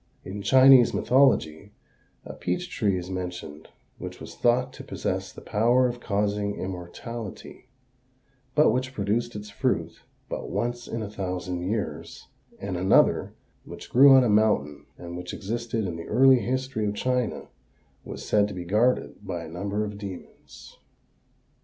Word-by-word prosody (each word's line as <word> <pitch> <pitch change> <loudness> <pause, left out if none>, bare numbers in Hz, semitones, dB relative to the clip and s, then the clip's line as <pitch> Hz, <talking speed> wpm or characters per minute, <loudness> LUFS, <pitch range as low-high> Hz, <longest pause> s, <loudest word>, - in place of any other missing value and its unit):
In 100 +2 -6
Chinese 130 +2 +6
mythology 105 - +2 0.5
a - - -7
peach 135 - -3
tree 100 -5 0
is 90 +1 -6
mentioned 90 -4 -6 0.3
which - - -7
was - - -9
thought 125 +2 +1
to - - -10
possess - - -3
the - - -12
power 120 +4 +2
of 120 0 -5
causing 100 -1 -1
immortality 95 +7 -7 0.9
but 150 - +5
which 130 +1 -2
produced 110 +3 -1
its 105 0 -7
fruit - - -2 0.3
but - - -5
once 120 +5 -3
in 115 -1 -4
a 105 - -5
thousand 90 -2 -4
years, 105 -3 -5 0.3
and 95 -2 -4
another, 95 +2 +3 0.3
which - - -11
grew 135 +2 +8
on 130 - +7
a - - +2
mountain 105 -10 +1
and 85 0 -8
which 90 0 -6
existed 115 +1 -3
in 85 -3 -4
the 85 - -8
early 130 +3 +6
history 130 -1 -2
of 105 - -2
China, 125 0 -1 0.5
was - - -8
said 105 -1 +3
to 105 - -7
be 90 -1 -6
guarded 110 +7 +1
by 90 -4 -5
a - - -8
number 100 +6 -3
of 105 -1 -7
demons. 90 -9 -11
105 Hz, 155 wpm, -26 LUFS, 90-120 Hz, 0.9 s, grew